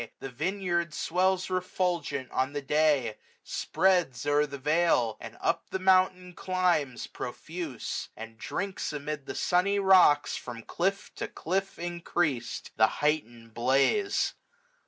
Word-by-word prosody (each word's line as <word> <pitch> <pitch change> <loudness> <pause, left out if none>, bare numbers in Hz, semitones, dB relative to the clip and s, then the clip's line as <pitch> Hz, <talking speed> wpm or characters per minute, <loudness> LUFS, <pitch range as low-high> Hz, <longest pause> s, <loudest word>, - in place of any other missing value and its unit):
The 135 - -6
vineyard 170 +2 -1
swells 185 +2 +1
refulgent 175 -7 -1
on 130 +2 0
the 145 - -2
day 150 -1 +3
j 110 -2 -5 0.3
Spreads 175 -10 +1
o'er 145 +1 +3
the 140 -1 -7
vale 150 -6 +2
j - - -5
or - - -14
up - - -1
the - - -2
mountain 185 -1 +3
climbs, 175 -8 0
685 - - -10
Profuse; 155 0 -5
and 115 +1 -8
drinks 195 -4 -3
amid 150 -1 -5
the - - -5
sunny 190 +3 +2
rocks. 185 -7 +5
From 115 -2 -7
cliff 195 - -2
to - - -3
cliff 190 +4 -2
increas'd, 170 -7 -2
the 110 0 +6 0.2
heightened 120 -7 -1
blaze. 135 - +2
155 Hz, 135 wpm, -29 LUFS, 135-185 Hz, 0.3 s, the